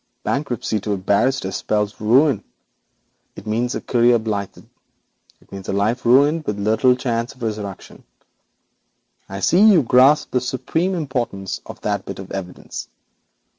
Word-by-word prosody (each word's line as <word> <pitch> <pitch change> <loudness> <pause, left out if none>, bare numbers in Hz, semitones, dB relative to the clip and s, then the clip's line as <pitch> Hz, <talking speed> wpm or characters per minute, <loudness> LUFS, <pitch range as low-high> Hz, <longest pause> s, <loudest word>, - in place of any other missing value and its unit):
Bankruptcy 125 -5 -2
to 105 +1 -2
a - - -1
barrister 100 +3 +1 0.2
means 105 -1 0
ruin. 125 +1 +3 0.9
It - - -11
means 115 +3 -1
a - - -3
career 120 0 +3
blighted; 105 -3 -5 0.7
it - - -27
means 95 -1 -8
a - - -1
life 110 +5 0
buried, 145 +6 +4
with 105 - -2
little 110 +5 +3
chance 120 0 -3
of 125 - -11
resurrection. 105 -3 -6 1.3
I 95 0 -6
see, 175 - +3
you 205 -8 +6
grasp 130 +5 +4
the 125 - +1
supreme 165 +9 -1
importance 125 - -3
of - - -10
that 100 -2 -2
bit 95 - -7
of 95 -1 -9
evidence. 90 -2 -7
115 Hz, 145 wpm, -20 LUFS, 100-130 Hz, 1.3 s, you